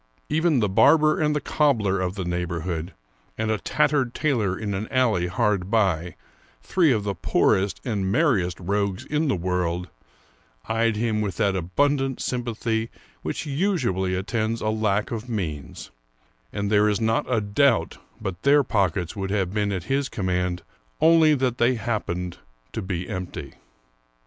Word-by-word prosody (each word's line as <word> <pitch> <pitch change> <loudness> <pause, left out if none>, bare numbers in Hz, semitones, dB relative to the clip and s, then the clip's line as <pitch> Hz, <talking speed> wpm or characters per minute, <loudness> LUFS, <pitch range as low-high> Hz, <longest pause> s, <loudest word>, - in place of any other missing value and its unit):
Even 160 -5 +2
the 105 - +2
barber 155 +10 +4
and 150 -1 +2
the - - +1
cobbler 115 -10 +1
of 90 +1 -2
the 95 -3 -4
neighborhood, 85 -1 -3 0.4
and 110 0 0
a 110 - 0
tattered 135 - +1
tailor 110 -11 0
in 105 -2 -3
an 100 +3 -3
alley 115 -9 +1
hard 100 -1 0
by, 90 -6 +1 0.5
three 170 -6 +3
of 110 -4 +1
the 100 -1 -1
poorest 95 +2 +1
and 100 -6 -1
merriest 100 - +1
rogues 100 +3 -1
in 150 +1 0
the 135 - +2
world, 90 0 -2 0.8
eyed 115 0 +1
him 110 -1 0
with 100 -5 -3
that 100 -1 +1
abundant 135 - 0
sympathy 115 -2 -2 0.3
which - - -4
usually 135 - 0
attends 110 +4 -1
a 110 - -1
lack 110 -1 0
of 115 +1 -5
means, 80 - -5 0.6
and 100 0 -2
there 105 0 +4
is 105 - 0
not 115 +2 0
a 115 - +3
doubt 100 - +1 0.2
but 95 -2 -5
their 145 +1 +5
pockets 95 -6 0
would 95 -1 -3
have 95 -2 -1
been 105 -1 0
at 95 -3 -3
his 135 +6 -1
command, 90 -2 -1 0.4
only 160 -1 +5
that 125 -2 -1
they 120 +2 +3
happened 95 -6 -3 0.3
to - - -3
be 90 -2 -4
empty. 90 -1 -6
105 Hz, 155 wpm, -24 LUFS, 95-125 Hz, 0.8 s, their